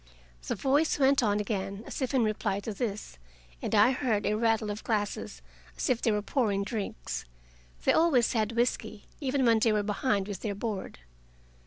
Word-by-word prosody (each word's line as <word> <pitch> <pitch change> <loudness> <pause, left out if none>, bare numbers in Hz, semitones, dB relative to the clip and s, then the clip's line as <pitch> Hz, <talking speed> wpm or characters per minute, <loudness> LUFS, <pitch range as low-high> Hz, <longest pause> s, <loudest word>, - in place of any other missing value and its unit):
The - - -1
voice 290 +4 +2
went 275 -1 +4
on 210 -3 +2
again, 200 0 -3
as - - -6
if 260 - 0
in 250 - +4
reply 215 -2 0
to 215 +1 -4
this, 205 - -4 0.4
and - - -1
I 215 +5 +6
heard 245 -6 0
a - - +2
rattle 225 -1 +1
of 205 - -6
glasses, 205 - -2 0.3
as - - 0
if 245 - 0
they 230 - +2
were 210 -1 0
pouring 210 -6 0
drinks. 130 - -4 0.6
They - - +4
always 285 -8 +3
had 220 -1 0
whisky, 230 -3 -1
even 270 -2 0
when 230 -1 +5
they 225 0 +3
were 210 -1 +1
behind 205 -1 0
with 200 -3 -5
their 205 -3 -3
board. 205 -2 -4
215 Hz, 185 wpm, -29 LUFS, 205-245 Hz, 0.6 s, I